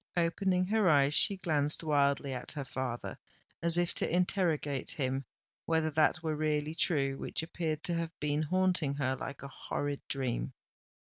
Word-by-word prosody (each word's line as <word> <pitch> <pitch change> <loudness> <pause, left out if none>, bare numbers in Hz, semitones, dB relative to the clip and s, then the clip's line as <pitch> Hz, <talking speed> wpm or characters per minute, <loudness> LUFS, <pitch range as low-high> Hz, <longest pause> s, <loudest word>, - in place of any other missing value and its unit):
Opening 180 +2 +1
her 210 -1 +2
eyes, 140 -1 +4
she 200 +5 +5
glanced 155 -4 0
wildly 140 -2 +1
at 125 - -2
her 145 -3 -5
father, 125 -2 -4 0.4
as 170 0 +6
if 175 -1 +1
to - - 0
interrogate 170 -6 0
him 135 -1 -2 0.4
whether 160 -1 +1
that 155 +3 +2
were 155 -1 -1
really 150 0 -1
true 140 -5 0
which - - -3
appeared 160 -2 -3
to 175 - -1
have 165 -1 -4
been 150 0 0
haunting 180 -3 +1
her 130 -2 0
like 135 +1 -7
a - - -5
horrid 145 +1 -4
dream. 130 -1 -2
155 Hz, 160 wpm, -31 LUFS, 140-170 Hz, 0.4 s, as